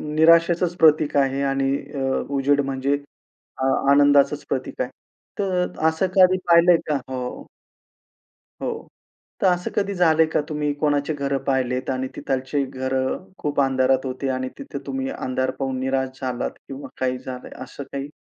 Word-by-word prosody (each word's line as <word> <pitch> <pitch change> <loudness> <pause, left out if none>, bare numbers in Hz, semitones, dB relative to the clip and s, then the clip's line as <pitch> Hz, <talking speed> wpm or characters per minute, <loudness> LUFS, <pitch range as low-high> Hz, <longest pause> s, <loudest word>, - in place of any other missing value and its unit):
निराशेचंच 170 +2 +4
प्रतीक 155 -2 +4
आहे 135 0 +2
आणि 135 0 +1 0.2
अ, - - -3 0.4
उजेड 140 +1 +3
म्हणजे 135 +1 0 0.6
अ, 130 - -1 0.3
आनंदाचंच 145 0 +4
प्रतीक 130 -1 -3
आहे 125 - -1 0.5
तर 185 -3 0 0.2
असं 160 +4 0
कधी 185 0 +6
पाहिलंय 170 +1 +6
का? 150 - +2
हो 125 -1 -5 1.2
हो, - - -1 0.7
तर - - +4
असं 180 -1 +1
कधी 200 0 0
झालंय 160 -3 +4
का - - +3
तुम्ही 150 -1 -1
कोणाची 145 0 +1
घरं 140 -1 -1
पाहिलेत 130 -1 -1
आणि 130 0 -1
तिथलचे 135 +2 -1
घरं 130 +4 -2
खूप 145 -1 -2
अंधारात 130 0 +2
होती, 130 +1 -3
आणि 130 0 -2
तिथे 280 - -7
तुम्ही 265 0 -2
अंधार 130 - -2
पाहून 130 -1 -2
निराश 130 0 -2
झालात 125 -2 -2 0.2
किंवा 135 +1 -8
काही 130 0 0
झालंय 125 0 -8
असं 140 +2 -9
काही? 140 +1 -4
140 Hz, 150 wpm, -23 LUFS, 130-160 Hz, 1.2 s, कधी